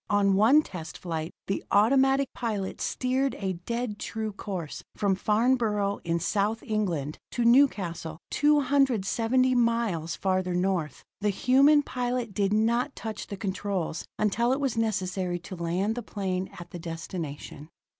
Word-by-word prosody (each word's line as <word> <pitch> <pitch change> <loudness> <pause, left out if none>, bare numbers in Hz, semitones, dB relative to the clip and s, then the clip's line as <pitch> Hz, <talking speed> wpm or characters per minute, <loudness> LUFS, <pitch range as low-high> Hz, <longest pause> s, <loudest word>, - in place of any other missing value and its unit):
On 200 -1 +3
one 230 +10 +5
test 165 - -8
flight 165 -2 -4
the 195 - -2
automatic 270 +5 +3
pilot 210 -5 -3
steered 260 +2 0
a 190 -2 -2
dead 235 -3 -2
true 220 -1 -3
course 190 -6 -6
from 200 -2 +1
Farnborough 210 -1 +1
in 170 0 0
South 205 +6 0
England, 175 -9 -2
to 240 - -1
Newcastle, 195 - +3
270 260 -4 +2
miles 230 -9 +1
farther 185 -2 0
north. 180 -6 -1 0.2
The 205 +1 +1
human 275 +8 +5
pilot 245 -4 -2
did 200 0 +1
not 230 +5 +1
touch 220 -2 -6
the 200 - -6
controls 190 -3 -2
until 230 +4 +1
it 265 - +1
was 275 -4 0
necessary 190 -5 -1
to 185 - -8
land 175 +5 -1
the 245 - -4
plane 190 -4 -3
at 175 - -10
the 175 - -7
destination. 165 -3 -6
205 Hz, 140 wpm, -27 LUFS, 185-240 Hz, 0.2 s, one